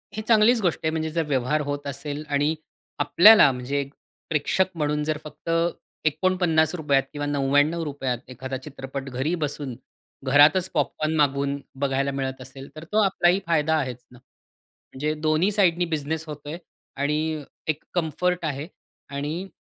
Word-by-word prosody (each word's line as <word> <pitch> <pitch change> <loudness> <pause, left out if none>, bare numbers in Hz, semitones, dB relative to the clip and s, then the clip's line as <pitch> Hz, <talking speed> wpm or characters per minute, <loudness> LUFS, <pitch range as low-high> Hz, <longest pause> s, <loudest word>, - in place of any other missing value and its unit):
हे 215 - -3
चांगलीच 225 +1 +4
गोष्ट 175 -4 +1
आहे 160 - +2
म्हणजे 160 0 -2
जर 165 +1 0
व्यवहार 140 +2 +1
होत 145 0 -4
असेल 145 +2 -5
आणि 145 +2 +1 0.4
आपल्याला 175 +3 +7
म्हणजे 130 +3 -2 0.5
प्रेक्षक 160 +4 +1
म्हणून 150 -1 0
जर 155 0 -1
फक्त 150 +2 -10 0.6
₹49 160 -2 +2
किंवा 145 -1 -4
₹99 145 -1 +1
त 125 - -23
एखादा 130 +1 -5
चित्रपट 135 0 -7
घरी 135 +6 -1
बसून 145 -3 -3 0.5
घरातच 150 +7 +5
पॉपकॉर्न 155 +1 0
मागवून 140 -1 +1 0.2
बघायला 140 0 +1
मिळत 135 -1 -4
असेल 135 +1 -10
तर 155 - -8
तो 215 +1 +3
आपलाही 185 -1 +3
फायदा 160 -1 +2
आहेच 130 -5 -3
ना. 125 - -15
म्हणजे 135 +3 -8
दोन्ही 155 +5 +2
साइडनी 180 -4 +3
बिझनेस 160 -1 -3
होतोय 150 +1 -7 0.4
आणि 150 +2 -1 0.2
एक 155 -1 -1
कम्फर्ट 175 +1 0
आहे 145 0 -3 0.5
आणि 155 +7 -3
150 Hz, 140 wpm, -24 LUFS, 140-160 Hz, 0.6 s, आपल्याला